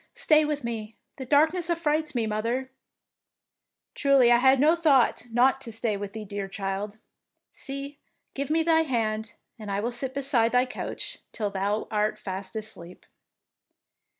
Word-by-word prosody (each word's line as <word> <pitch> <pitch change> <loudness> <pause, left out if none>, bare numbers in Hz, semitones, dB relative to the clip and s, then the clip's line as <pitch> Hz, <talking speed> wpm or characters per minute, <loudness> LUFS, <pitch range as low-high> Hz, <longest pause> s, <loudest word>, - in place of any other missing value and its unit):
Stay 310 -1 +4
with 295 -2 -2
me; 225 -2 -5 0.2
the 260 - -6
darkness 320 +5 +3
affrights 310 -3 0
me, 235 -2 +1
mother." 230 +5 -2 0.6
" - - -63
Truly 275 -4 +4
I 240 - +7
had 265 +2 +5
no 310 +4 +5
thought 275 -8 +3
not 260 +3 +3
to 235 - -6
stay 225 -1 -1
with 200 0 -6
thee, 220 -1 -6
dear 200 -1 -4
child. 195 +1 -4 0.5
See, 275 +1 -6 0.3
give 280 +1 -3
me 325 +1 +2
thy 325 0 +4
hand, 220 -7 -2 0.2
and 210 -2 -7
I 200 0 -1
will 235 +4 -2
sit 260 +2 -2
beside 265 -5 +2
thy 250 +1 +4
couch 250 - -6
till 210 -3 -3
thou 200 +2 -1
art 215 0 0
fast 195 -1 -6
asleep." 210 -5 -8
240 Hz, 160 wpm, -26 LUFS, 215-280 Hz, 0.6 s, I